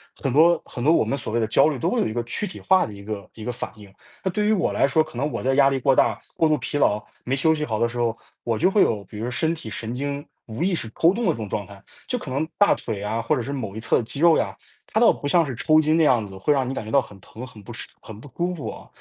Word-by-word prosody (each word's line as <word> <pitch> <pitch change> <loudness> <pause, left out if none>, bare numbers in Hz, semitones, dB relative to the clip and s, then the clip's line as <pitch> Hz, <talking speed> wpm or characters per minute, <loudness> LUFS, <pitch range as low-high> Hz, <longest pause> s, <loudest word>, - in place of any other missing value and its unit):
很 135 - -2
多 165 +4 +5
很 120 - -7
多 155 - +5
我 - - +4
们 140 - -1
所 110 - -5
谓 120 - +2
的 110 - +1
焦 110 - +4
虑 150 -4 -1
都 - - 0
会 - - 0
有 - - +1
一 110 - -4
个 120 0 -1
躯 205 - -3
体 - - -9
化 190 -1 +4
的 105 - -9
一 100 0 -11
个 100 -2 -6
一 110 - -9
个 125 - -2
反 120 - -5
应。 100 -2 -14 0.3
那 190 - 0
对 210 +3 0
于 220 - +4
我 185 - +1
来 135 - +3
说， 155 +3 +3
可 155 -6 -11
能 145 +4 0
我 - - -3
在 135 +1 +2
压 140 -1 +6
力 135 -1 -1
过 135 +1 +3
大、 - - +3 0.2
过 160 - +3
度 155 - +3
疲 145 - -3
劳、 105 -6 +2 0.2
没 130 +2 0
休 160 +4 +3
息 150 -1 -2
好 110 -2 -2
的 120 - +3
时 120 0 -6
候， 115 -1 0 0.3
我 115 -2 -1
就 180 +4 +3
会 205 - +4
有， 105 -3 +2
比 105 - -11
如 120 +2 -2
身 160 +6 0
体 115 -8 -8
神 110 +2 -5
经 140 +2 -3 0.2
无 110 +7 -6
意 190 0 +1
识 110 - -4
抽 170 +3 +5
动 235 +1 -2
的 - - +4
这 - - -3
种 110 -2 -5
状 105 - -3
态。 100 -1 -14 0.3
就 250 - -1
可 150 - -8
能 150 +4 -1
大 205 - +5
腿 100 - -5
呀， 110 +3 -2
或 155 - +1
者 125 - -1
是 140 - -5
某 110 -7 -5
一 - - -4
侧 115 - +1
肌 140 +5 -6
肉 170 -1 +6
呀， 95 -2 -1 0.3
它 - - -1
倒 - - +7
不 145 - -4
像 170 +2 +4
是 130 -4 -5
抽 155 +3 +4
筋 155 +2 +2
的 165 - +4
样 120 -7 +3
子， 95 -1 -10
会 145 +10 +2
让 135 -2 0
你 - - -2
感 105 - -4
觉 110 - -7
到 140 - +5
很 100 -5 -13
疼、 115 +6 -10
很 110 -5 -13
不 - - -9
适、 - - -7
很 110 -1 -10
不 145 - -12
舒 175 +1 0
服 150 - -5
啊， - - -10
130 Hz, 355 characters per minute, -23 LUFS, 110-155 Hz, 0.3 s, 倒